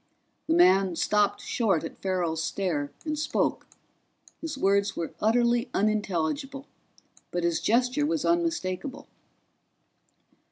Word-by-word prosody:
The 325 - +2
man 190 - +5
stopped 205 +4 +1
short 205 - 0
at 165 - -8
Farrell's 175 -4 -1
stare 160 -7 -2
and 305 -1 -2
spoke; 305 - -1 0.7
his 320 -4 -5
words 200 -3 +2
were 165 - -4
utterly 235 +2 +2
unintelligible, 215 - -1 0.6
but 175 0 -2
his 170 -1 +1
gesture 250 +6 +2
was 315 -2 -1
unmistakable. 285 - -1
210 Hz, 110 wpm, -27 LUFS, 180-275 Hz, 0.7 s, man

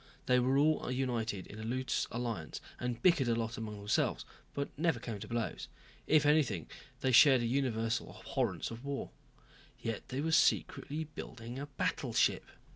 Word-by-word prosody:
They 125 0 +4
were 130 +2 +2
all 155 0 +3
united 120 -7 -1
in 105 - -10
a - - -5
loose 130 +3 -1
alliance 115 -9 -4 0.2
and 120 -1 -2
bickered 165 -8 +5
a 115 - +2
lot 115 0 -2
among 110 -2 -5
themselves, 100 +1 0 0.3
but 140 0 -3
never 165 +1 +1
came 110 -4 -5
to 105 - -7
blows. 120 0 -3 0.4
If 150 -1 +5
anything, 145 - +3 0.3
they 130 - +2
shared 130 +1 +8
a - - 0
universal 115 -2 0
abhorrence - - -2
of 115 +2 -8
war. 140 -1 -4 0.7
Yet 115 -2 -4
they 130 - -3
were 160 +2 0
secretly 160 -1 +2
building 125 -5 -8
a 145 - -5
battleship. 140 - +1
125 Hz, 165 wpm, -33 LUFS, 115-140 Hz, 0.7 s, shared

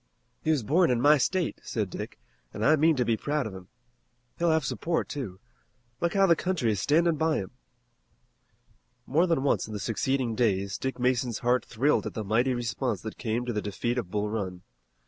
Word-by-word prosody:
"He - - -2
was 150 -6 +2
born 165 - +3
in 125 -2 +2
my 145 +4 +5
state," 180 +5 0
said - - -3
Dick, - - -6 0.4
"and 105 - -1
I 155 - +6
mean 160 +1 +4
to 125 -2 +1
be 115 - +2
proud 145 +4 -1
of 110 - -5
him. 95 -1 -10 0.7
He'll 170 0 +2
have 160 -3 +2
support, 165 +5 -1
too. 105 -11 -6 0.6
Look 170 +2 -1
how 195 0 +5
the 170 -3 +5
country 165 -11 0
is 105 - -1
standing 165 - +3
by 160 0 +2
him!" 95 - -4 1.5
More 165 +7 +2
than 165 -6 +1
once 140 - +1
in 110 - -8
the 105 - -4
succeeding 120 +3 -1
days 100 -4 0
Dick 130 0 -3
Mason's 125 -2 +1
heart 125 +1 +3
thrilled 135 +6 +1
at - - -7
the 110 - -3
mighty 120 +5 +1
response 120 +2 -2
that 110 - -7
came 115 +1 -1
to 120 - -2
the 105 - -1
defeat 110 +5 -2
of 95 - -5
Bull 105 +2 -1
Run. 95 -5 -4
125 Hz, 205 wpm, -28 LUFS, 110-155 Hz, 1.5 s, I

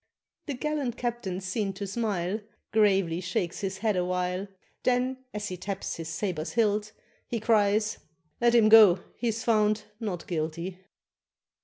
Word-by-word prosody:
The 285 - -2
gallant 280 -3 -2
captain's 225 -6 -3
seen 195 +1 -1
to 200 +1 -5
smile, 200 -2 -1 0.3
Gravely 195 -5 +3
shakes 180 -1 -2
his 195 -2 -3
head 215 -1 +1
awhile, 180 +1 -1 0.3
Then, 255 +1 +1
as 210 0 -4
he 185 - -5
taps 195 +1 -4
his 165 -1 -5
sabre's 165 -1 -3
hilt, 215 -2 +1 0.4
he 235 - -2
Cries, 215 -1 +2 0.4
"Let 240 0 +4
him 225 -2 +6
go! 215 -5 +8
he's 230 -1 -2
found 215 -2 +2 0.2
'not 195 -7 -4
guilty. 170 +2 -3
205 Hz, 140 wpm, -28 LUFS, 180-225 Hz, 0.4 s, go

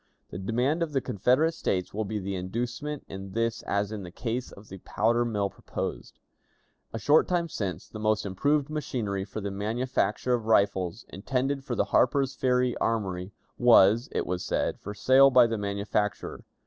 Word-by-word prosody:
The - - -6
demand 125 - 0
of 160 -3 -1
the 135 - +2
Confederate 130 - +2
States 95 - -2
will 110 +1 -2
be 105 +2 -3
the 100 -1 -4
inducement 120 +10 -4
in 95 0 -8
this 115 0 -1
as 100 +1 0
in 110 -2 -5
the 90 - -8
case 120 +6 -4
of 100 +1 -14
the 95 - -10
powder 115 +6 +1
mill 105 -4 -1
proposed. - - -6 0.7
"A - - -4
short 145 +7 +4
time 175 -2 0
since, 95 - -4
the 110 - -9
most 110 0 +1
improved 140 +10 +1
machinery 115 -10 -3
for 105 - -6
the 100 0 -3
manufacture 110 +2 -1
of 115 -3 -1
rifles, 100 -1 +1
intended 130 +8 -2
for 130 -4 -3
the - - +1
Harper's 135 +1 +3
Ferry 125 -1 +1
Armory, 95 -4 -2 0.3
was, 115 -1 +5
it - - -1
was 90 0 -3
said, - - -1
for 105 +1 -7
sale 130 +6 +6
by 125 -2 +6
the 115 -2 -2
manufacturer. 100 +1 -2
110 Hz, 175 wpm, -27 LUFS, 100-125 Hz, 0.7 s, sale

